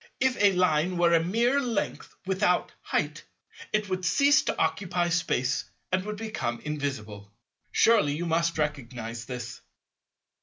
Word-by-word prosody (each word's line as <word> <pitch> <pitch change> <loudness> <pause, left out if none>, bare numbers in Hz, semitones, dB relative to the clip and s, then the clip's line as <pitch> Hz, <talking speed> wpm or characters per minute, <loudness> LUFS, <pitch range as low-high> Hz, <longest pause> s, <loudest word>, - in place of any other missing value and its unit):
If 260 -1 +2
a 200 -1 +5
Line 180 -1 +2
were 170 -1 +4
mere 230 +11 +2
length 235 -5 -3
without 190 -1 +1
"height," - - -2 0.5
it 210 -1 0
would 185 -1 -3
cease 280 - +4
to - - -1
occupy 175 -2 0
Space 135 -6 0 0.3
and 185 0 +1
would 210 0 -4
become 200 - -3
invisible. 120 -9 -5 0.4
Surely 205 -11 +4
you 170 +3 -3
must 170 0 +1
recognize 120 -6 -3
this? 120 -2 -7
170 Hz, 130 wpm, -27 LUFS, 140-200 Hz, 0.5 s, a